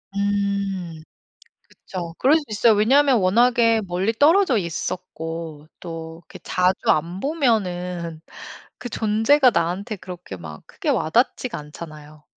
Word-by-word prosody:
음. 200 -5 -2 0.6
그쵸. 175 -3 -8
그럴 290 +5 +5
수 310 - -4
있어요 220 +2 +4
왜냐면 260 +6 +4
워낙에 230 +3 +3
멀리 185 +5 0
떨어져 300 - +4
있었고 165 -3 -5
또 165 -1 -8
이렇게 - - -13
자주 185 +1 +1
안 170 +4 -1
보면은 180 - -1 0.6
그 245 - -6
존재가 230 +6 +3
나한테 180 +5 -1
그렇게 180 - -9
막 80 -3 -10
크게 - - -5
와 155 - +1
닿지가 245 +3 +1
않잖아요. 150 0 -11
185 Hz, 260 characters per minute, -22 LUFS, 165-230 Hz, 0.6 s, 그럴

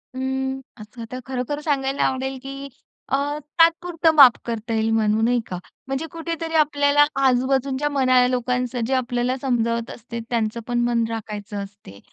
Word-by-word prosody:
अं, 265 0 -2 0.2
असं 230 +2 -9
तर 255 - -5
खरोखर 260 +3 -3
सांगायला 275 -2 0
आवडेल, 265 0 -1
की 275 +1 -7 0.4
अ, - - +4 0.4
तात्पुरतं 330 0 +4
माफ 275 -5 +10
करता 230 0 -4
येईल 220 0 +1
म्हणू, 220 0 +2
नाही 240 +1 +3
का? 180 - -5 0.3
म्हणजे 270 +4 -2
कुठेतरी 330 0 -4
आपल्याला 290 -1 +4 0.2
आजूबाजूंच्या 265 +2 +1
मनाला, 255 -3 +3
लोकांचं 250 0 -1
जे 270 - -1
आपल्याला 245 0 0
समजावत 235 -3 0
असते, 235 0 -7
त्यांचं 230 -1 -1
पण 240 0 0
मन 235 -1 +1
राखायचं 210 -2 -6
असते 195 - -13
255 Hz, 150 wpm, -22 LUFS, 235-275 Hz, 0.4 s, माफ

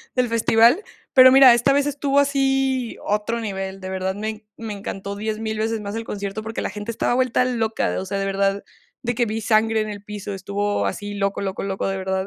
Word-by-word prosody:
del 250 -1 +2
festival. 230 - +4 0.3
Pero 260 -2 +9
mira, 265 -2 +9
esta 240 +4 +3
vez 285 0 +2
estuvo 285 -1 +1
así, 270 -3 +1
otro 210 +3 -1
nivel, 195 -3 -4
de 185 - -6
verdad, 190 0 -2
me 215 +1 -3
en 215 0 -7
me 225 -2 -5
encantó 200 0 -6
10,000 220 +1 -3
veces 220 0 -1
más 205 +1 -5
el 225 - -3
concierto 200 0 -5
porque 220 +1 -5
la - - -2
gente 210 +3 -5
estaba 230 - 0
vuelta 250 0 +2
loca. 225 -3 -1
O - - -6
sea, 200 +1 -3
de 195 - -1
verdad, 195 0 0 0.4
de 240 +1 -1
que 240 - +2
vi 220 +1 -2
sangre 220 0 +2
en 215 - -3
el 205 -1 -7
piso, 205 -1 -6
estuvo 200 +2 -1
así 205 0 -5
loco, 200 0 -1
loco, 195 -1 -3
loco, 195 0 -2
de 195 0 -2
verdad. 190 0 -2
215 Hz, 220 wpm, -22 LUFS, 200-240 Hz, 0.4 s, Pero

